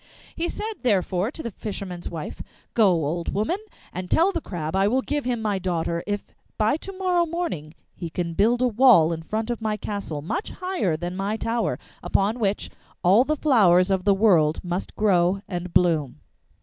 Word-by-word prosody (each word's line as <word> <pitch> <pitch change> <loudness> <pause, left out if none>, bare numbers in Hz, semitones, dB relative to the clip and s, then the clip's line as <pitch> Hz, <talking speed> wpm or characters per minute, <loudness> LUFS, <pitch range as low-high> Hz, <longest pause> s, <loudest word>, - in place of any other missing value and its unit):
He 345 +1 -2
said, 435 0 -5
therefore, 195 -4 +1
to 315 - -8
the 235 - -4
fisherman's 190 -4 -6
wife, 160 -3 -6 0.3
'Go, 215 -5 +5
old 170 +3 -2
woman, 220 - 0 0.3
and 180 0 -5
tell 350 +4 +4
the 335 - -3
Crab 160 - -4
I 195 +1 +3
will 255 +5 +1
give 295 -2 -2
him 240 -3 -1
my 205 -3 0
daughter 170 -2 -1
if 205 0 -2 0.3
by 220 +5 +2
to 390 - -8
morrow 365 -2 +1
morning 315 - -4 0.2
he 170 - -6
can 170 0 -3
build 235 +7 +2
a - - +4
wall 225 -9 +5
in 165 - -5
front 220 +7 -3
of 235 - -4
my 215 -1 -1
castle 195 -8 -4
much 275 - -3
higher 365 - -1
than 175 +2 -4
my 200 +3 -2
tower, 230 +1 -1 0.2
upon 210 +5 +1
which 205 -2 -1 0.3
all 195 +7 +6
the 305 +3 0
flowers 195 - +4
of 190 -1 +1
the 200 0 +4
world 175 -7 +4
must 180 +1 -4
grow 190 -2 +2
and 180 -1 -4
bloom. 155 - +2
200 Hz, 190 wpm, -24 LUFS, 175-240 Hz, 0.3 s, all